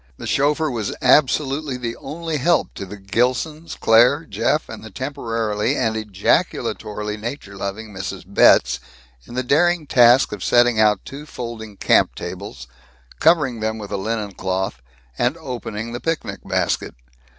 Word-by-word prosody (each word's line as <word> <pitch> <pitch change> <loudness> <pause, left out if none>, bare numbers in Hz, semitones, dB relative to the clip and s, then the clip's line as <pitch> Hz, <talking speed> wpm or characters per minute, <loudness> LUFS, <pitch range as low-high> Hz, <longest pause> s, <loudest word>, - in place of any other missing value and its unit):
The - - -8
chauffeur 150 +2 +1
was 110 -4 -3
absolutely 140 +1 +2
the 120 -2 -4
only 160 +2 -4
help 170 +5 +1
to 100 - -7
the 105 +3 -8
Gilsons, 125 +11 -1
Claire, 125 +8 +5
Jeff, 155 0 0
and 110 - -9
the 110 - -9
temporarily 115 -4 -2
and 110 0 0
ejaculatorily 105 0 -1
nature 110 -3 -6
loving 100 +2 -5
Mrs. 95 0 -5
Betz 65 -9 +4 0.5
in 120 - -10
the 130 - 0
daring 165 +5 +2
task 125 -1 +5
of 105 -3 -5
setting 120 -2 +4
out 105 -2 +3
two 145 +2 -9
folding 110 -6 -7
camp - - +3
tables, 60 -1 -7 0.5
covering 150 -8 +3
them 110 0 -2
with 105 -2 -8
a - - -1
linen 105 +1 -3
cloth, 95 -8 -3 0.4
and 125 +7 +1
opening 115 -6 -5
the 120 - -4
picnic 165 +2 -3
basket. - - -1
115 Hz, 150 wpm, -21 LUFS, 105-140 Hz, 0.5 s, Claire